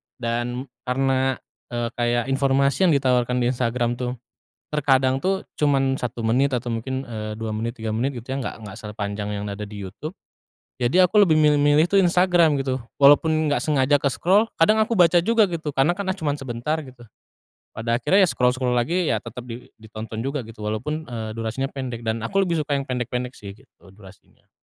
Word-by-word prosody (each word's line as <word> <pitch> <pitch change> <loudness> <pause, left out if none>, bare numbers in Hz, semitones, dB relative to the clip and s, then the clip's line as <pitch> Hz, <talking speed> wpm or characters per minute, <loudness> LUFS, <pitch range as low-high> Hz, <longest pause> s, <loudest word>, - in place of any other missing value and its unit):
Dan 120 +1 -3 0.2
karena, 130 0 +1 0.3
eee, 120 -1 -3
kayak 120 0 0
informasi 140 +6 +2
yang 160 - +4
ditawarkan 125 -2 +1
di 120 - +2
Instagram 120 -1 -1
tuh 125 0 -3 0.6
terkadang 135 -3 +2
tuh 190 +5 -1 0.2
cuman 135 -2 +2
1 120 -1 -4
menit 130 +4 +2
atau 120 0 -3
mungkin, 130 +4 -3
eee, 110 -4 -6
2 110 0 -4
menit, 115 +3 -3
3 110 -2 -4
menit 125 +5 -1
gitu 120 +2 -7
ya. 135 - -2
Enggak 130 - -4
enggak 105 -2 -9
sepanjang 105 -1 -4
yang 100 - -4
ada 105 +1 -6
di 105 - -10
YouTube. 155 - -8 0.7
Jadi 125 +9 +2
aku 185 +3 +5
lebih 160 -5 +4
milih-milih 150 +1 +4
tuh 195 +1 +3
Instagram 175 -4 +3
gitu. 130 -2 -2 0.2
Walaupun 145 +3 +6 0.2
enggak 145 - +1
sengaja 145 -2 +2
ke-scroll, 190 - +2
kadang 215 +6 +4
aku 220 -1 -1
baca 175 0 +5
juga 225 +2 +3
gitu. 165 -4 -4
Karena 140 +5 +2
kan, 200 - -4
ah, 190 - -2
cuman 150 -4 -1
sebentar 135 +3 -3
gitu. 130 -4 -14 0.7
Pada 115 +2 -1
akhirnya 190 +5 +4
ya - - -1
scroll-scroll 125 -1 +1
lagi, 170 +9 +1
ya 110 - -1
tetap 120 +1 -9
di 120 0 -9
ditonton 110 0 -8
juga 140 +1 -2
gitu 110 -2 -10
walaupun, 140 +9 -3
eee, 115 -4 -5
durasinya 115 +4 -3
pendek. 130 -4 -6
Dan 115 0 -2
aku 195 +11 +1
lebih 175 -3 0
suka 145 - -1
yang 140 -1 -2
pendek-pendek 125 0 -3
sih 100 -1 -9
gitu, 115 -4 -21
durasinya. 95 -1 -18
130 Hz, 190 wpm, -23 LUFS, 115-150 Hz, 0.7 s, Walaupun